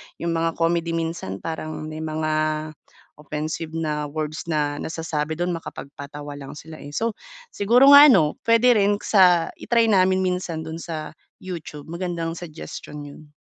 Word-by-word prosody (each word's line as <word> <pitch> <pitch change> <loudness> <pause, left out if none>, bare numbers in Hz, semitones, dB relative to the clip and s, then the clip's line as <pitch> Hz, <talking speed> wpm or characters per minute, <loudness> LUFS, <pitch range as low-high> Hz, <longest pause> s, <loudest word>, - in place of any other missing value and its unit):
yung 170 - -3
mga 165 0 0
comedy 170 0 0
minsan 165 - -4
parang 155 -1 -4 0.2
may 155 - -6
mga 155 0 -2 0.9
offensive 155 +2 -4
na 150 -2 -2
words 155 +2 -4
na 145 -2 -1
nasasabi 160 -1 -3
do'n 175 +2 -1
makapagpatawa 145 -3 -8
lang 135 0 -9
sila, 155 +1 -10
eh. 145 0 -9
So, 230 +5 0 0.4
siguro 245 +7 +5
nga 285 +1 +11
ano, 170 - +4
puwede 230 +2 +5
rin 205 -2 +3
sa 180 -5 +4
i-try 230 -2 +2
namin 190 -1 +3
minsan 180 -3 -2
do'n 160 +1 -6
sa 160 -2 -5 0.3
YouTube, 165 -5 -7
magandang 170 -2 -3
suggestion 160 -3 -8
'yon. 145 +1 -13
165 Hz, 145 wpm, -23 LUFS, 155-180 Hz, 0.9 s, nga